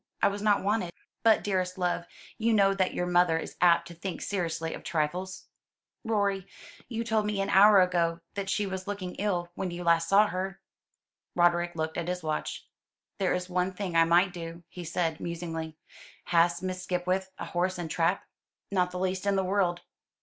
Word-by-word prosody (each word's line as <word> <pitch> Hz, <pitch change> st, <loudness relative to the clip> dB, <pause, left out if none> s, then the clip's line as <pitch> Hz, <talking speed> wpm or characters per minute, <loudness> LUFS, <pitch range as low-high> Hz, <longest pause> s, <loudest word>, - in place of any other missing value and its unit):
I -, -, +6 dB
was 200 Hz, +1 st, -5 dB
not 205 Hz, -2 st, +3 dB
wanted." 200 Hz, -4 st, 0 dB, 0.3 s
"But, 225 Hz, -1 st, +4 dB
dearest 185 Hz, -2 st, -1 dB
love, 175 Hz, -1 st, -1 dB, 0.3 s
you 225 Hz, +1 st, +2 dB
know 195 Hz, -2 st, +4 dB
that 190 Hz, -1 st, 0 dB
your 180 Hz, -, 0 dB
mother 175 Hz, -2 st, +3 dB
is -, -, -6 dB
apt 170 Hz, -1 st, +5 dB
to 170 Hz, -, -9 dB
think 175 Hz, +2 st, -5 dB
seriously 165 Hz, -4 st, -2 dB
of -, -, -8 dB
trifles." 175 Hz, +4 st, -2 dB, 0.6 s
"Rorie, 200 Hz, -4 st, 0 dB, 0.4 s
you 230 Hz, -2 st, -2 dB
told 220 Hz, -2 st, +1 dB
me 210 Hz, -1 st, -1 dB
an 195 Hz, -, 0 dB
hour 205 Hz, +1 st, +8 dB
ago 170 Hz, -2 st, +1 dB
that 200 Hz, -1 st, -4 dB
she 205 Hz, -, +1 dB
was 190 Hz, 0 st, -5 dB
looking 195 Hz, -3 st, -4 dB
ill 180 Hz, -4 st, -1 dB
when 185 Hz, +1 st, -3 dB
last 170 Hz, -1 st, +1 dB
you -, -, -7 dB
saw 200 Hz, +2 st, +6 dB
her." 190 Hz, +1 st, -4 dB, 0.8 s
Roderick 175 Hz, 0 st, +2 dB
looked 160 Hz, +1 st, -2 dB
at 170 Hz, -, -4 dB
his 180 Hz, -1 st, -3 dB
watch. 155 Hz, -1 st, -3 dB, 0.5 s
"There 190 Hz, -2 st, +2 dB
is 180 Hz, 0 st, -3 dB
one 180 Hz, +1 st, 0 dB
thing 185 Hz, -2 st, -4 dB
I 165 Hz, 0 st, +6 dB
might 175 Hz, +3 st, +4 dB
do," 170 Hz, -1 st, -7 dB
he 180 Hz, -, -8 dB
said, 165 Hz, -1 st, -1 dB
musingly. 165 Hz, -2 st, -5 dB, 0.5 s
"Has 170 Hz, +1 st, +2 dB
Miss 185 Hz, 0 st, -3 dB
Skipwith 185 Hz, +1 st, -1 dB
a -, -, -5 dB
horse 180 Hz, +2 st, -1 dB
and 170 Hz, -3 st, -5 dB
trap?" 170 Hz, +3 st, +1 dB, 0.5 s
"Not 180 Hz, -2 st, +2 dB
the 180 Hz, -, -6 dB
least 185 Hz, +1 st, -1 dB
in 200 Hz, -, +3 dB
the 190 Hz, -, +1 dB
world." 185 Hz, -2 st, +1 dB
180 Hz, 190 wpm, -28 LUFS, 170-195 Hz, 0.8 s, hour